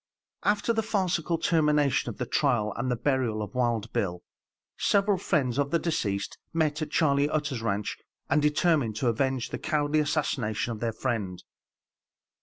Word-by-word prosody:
After 205 +2 +2
the 225 - +1
farcical 180 -6 0
termination 150 -4 +2
of - - -7
the - - -2
trial, 105 0 +1
and 125 +2 -2
the 125 - +1
burial 120 -4 0
of 105 - -8
Wild 120 -3 0
Bill, 90 -3 -1 0.5
several 200 -1 +2
friends 140 -9 0
of 140 0 +1
the 170 - +2
deceased 100 - -2
met 155 -2 +1
at 155 - -2
Charley 145 -2 +2
Utter's 150 -6 -1
ranche 105 -2 -2 0.3
and 150 +1 +2
determined 150 - +2
to 120 +2 +1
avenge 130 +1 -1
the - - -4
cowardly 150 -1 +1
assassination 130 -8 0
of 110 - -5
their 115 0 -1
friend. 110 -6 -3
140 Hz, 160 wpm, -27 LUFS, 115-155 Hz, 0.5 s, After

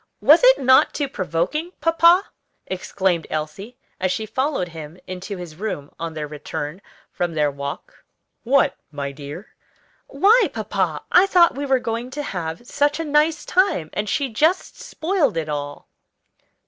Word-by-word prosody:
"Was - - +6
it - - +7
not 260 0 +4
too 285 - -1
provoking, 215 - -2
papa?" 335 +3 +5 0.4
exclaimed 185 -2 -1
Elsie, 155 +10 -5 0.2
as 185 -1 0
she 220 - -2
followed 260 - -1
him 160 0 -9
into 185 +2 -6
his 170 -3 -9
room 175 -8 -5
on 165 -1 -5
their 155 -1 -3
return 150 +3 -6 0.3
from 175 -2 -3
their 150 -2 +2
walk. 140 +1 -7 0.4
"What, 270 +4 +3 0.2
my 140 -2 -4
dear?" 145 +7 -9 0.5
"Why, 405 - +4
papa, - - -2
I 370 +2 +6
thought 350 -3 +5
we 285 +1 -4
were 265 -1 +4
going 235 0 -4
to 295 - -2
have 175 - -5
such 290 +4 0
a 325 - -2
nice 300 +2 +2
time, 365 - +1
and 210 0 -2
she 280 -3 0
just 310 +11 +1
spoiled 315 - 0
it 155 -2 -2
all." 145 -1 -5
205 Hz, 155 wpm, -22 LUFS, -, 0.5 s, it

